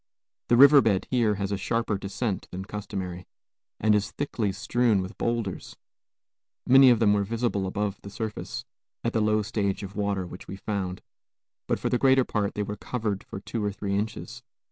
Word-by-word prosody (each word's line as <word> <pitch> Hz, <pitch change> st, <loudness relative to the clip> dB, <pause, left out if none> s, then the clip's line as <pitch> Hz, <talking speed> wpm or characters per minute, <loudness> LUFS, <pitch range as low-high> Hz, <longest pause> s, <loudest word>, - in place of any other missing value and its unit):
The 120 Hz, -, +4 dB
river 140 Hz, +2 st, +9 dB
bed 100 Hz, -6 st, +1 dB
here 115 Hz, -5 st, +2 dB
has 100 Hz, 0 st, -3 dB
a 100 Hz, -, 0 dB
sharper 115 Hz, +2 st, -1 dB
descent 100 Hz, +1 st, -3 dB
than 95 Hz, +1 st, -6 dB
customary, 95 Hz, -3 st, -5 dB, 0.5 s
and 110 Hz, 0 st, +3 dB
is 100 Hz, -2 st, +1 dB
thickly 115 Hz, -7 st, -2 dB
strewn 115 Hz, +1 st, +1 dB
with 95 Hz, 0 st, -5 dB
bowlders; 115 Hz, -5 st, -2 dB, 0.9 s
many 135 Hz, +1 st, +8 dB
of 120 Hz, -, +5 dB
them 105 Hz, -2 st, +4 dB
were 100 Hz, -1 st, +2 dB
visible 110 Hz, -2 st, -1 dB
above 100 Hz, +1 st, -2 dB
the 100 Hz, -, -9 dB
surface, 115 Hz, +3 st, -5 dB, 0.4 s
at 115 Hz, -, -1 dB
the 110 Hz, -, +2 dB
low 105 Hz, 0 st, +2 dB
stage 100 Hz, -2 st, -1 dB
of 100 Hz, +1 st, -8 dB
water 100 Hz, -2 st, -1 dB
which 90 Hz, +1 st, -10 dB
we 95 Hz, -, -6 dB
found, 95 Hz, -2 st, -4 dB, 0.6 s
but -, -, +1 dB
for -, -, -2 dB
the 125 Hz, -, +1 dB
greater 130 Hz, -1 st, +5 dB
part 105 Hz, -2 st, -1 dB
they 105 Hz, -, -1 dB
were 105 Hz, +1 st, -5 dB
covered 105 Hz, -4 st, -3 dB
for -, -, -8 dB
two 110 Hz, +1 st, -4 dB
or 105 Hz, -, 0 dB
three 100 Hz, 0 st, -3 dB
inches. 110 Hz, +3 st, -4 dB
105 Hz, 190 wpm, -27 LUFS, 100-115 Hz, 0.9 s, river